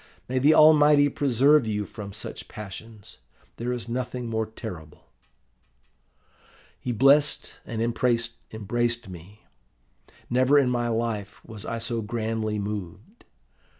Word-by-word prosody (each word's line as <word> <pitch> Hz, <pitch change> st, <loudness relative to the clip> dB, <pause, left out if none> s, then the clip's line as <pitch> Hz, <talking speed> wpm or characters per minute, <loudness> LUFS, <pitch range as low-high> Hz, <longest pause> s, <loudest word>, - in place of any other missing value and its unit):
May 130 Hz, +1 st, 0 dB
the 150 Hz, +4 st, +5 dB
Almighty 150 Hz, -2 st, +6 dB
preserve 140 Hz, 0 st, +3 dB
you 105 Hz, -1 st, -1 dB
from 100 Hz, -1 st, -8 dB
such 105 Hz, +2 st, -8 dB
passions! 105 Hz, +1 st, -10 dB, 0.4 s
There 120 Hz, +1 st, -3 dB
is 120 Hz, -2 st, -4 dB
nothing 125 Hz, 0 st, -4 dB
more 110 Hz, -1 st, -1 dB
terrible.' 90 Hz, -9 st, -9 dB, 1.7 s
"He 125 Hz, -, -3 dB
blessed 140 Hz, +5 st, +3 dB
and 115 Hz, -1 st, -2 dB
embraced 115 Hz, -1 st, -1 dB
me. 95 Hz, +4 st, -12 dB, 0.8 s
Never 130 Hz, +4 st, +3 dB
in 130 Hz, -3 st, +3 dB
my 120 Hz, -1 st, 0 dB
life 110 Hz, -3 st, -3 dB
was 110 Hz, -2 st, -9 dB
I 115 Hz, -, -3 dB
so 115 Hz, 0 st, -2 dB
grandly 110 Hz, -1 st, -2 dB
moved. 105 Hz, -, -6 dB
115 Hz, 115 wpm, -25 LUFS, 105-125 Hz, 1.7 s, Almighty